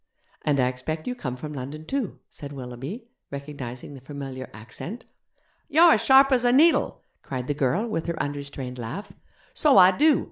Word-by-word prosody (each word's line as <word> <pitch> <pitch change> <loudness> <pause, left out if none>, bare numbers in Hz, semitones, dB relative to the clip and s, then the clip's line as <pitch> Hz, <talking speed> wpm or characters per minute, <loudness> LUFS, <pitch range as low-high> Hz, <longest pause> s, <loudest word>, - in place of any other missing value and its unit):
'And 145 -2 +1
I 125 - +4
expect 145 +5 -4
you 250 - -1
come 130 - -5
from 150 +4 -7
London 145 +3 -6
too?' 265 - -2
said 145 -1 -9
Willoughby, 135 - -7 0.2
recognizing 140 -2 -7
the 135 - -11
familiar 135 -2 -7
accent. 140 - -8 0.6
'You're 330 +2 +7
as - - +2
sharp 270 +1 +6
as 250 -2 +4
a 245 - +4
needle,' 315 +6 +4 0.2
cried 130 -2 -5
the 145 - -1
girl 145 - 0
with 175 -8 -3
her 170 -1 -2
unrestrained 140 -3 -5
laugh; 135 - -6 0.4
'so 300 - +4
I 185 0 +9
do. 300 +9 +4
145 Hz, 175 wpm, -25 LUFS, -, 0.6 s, I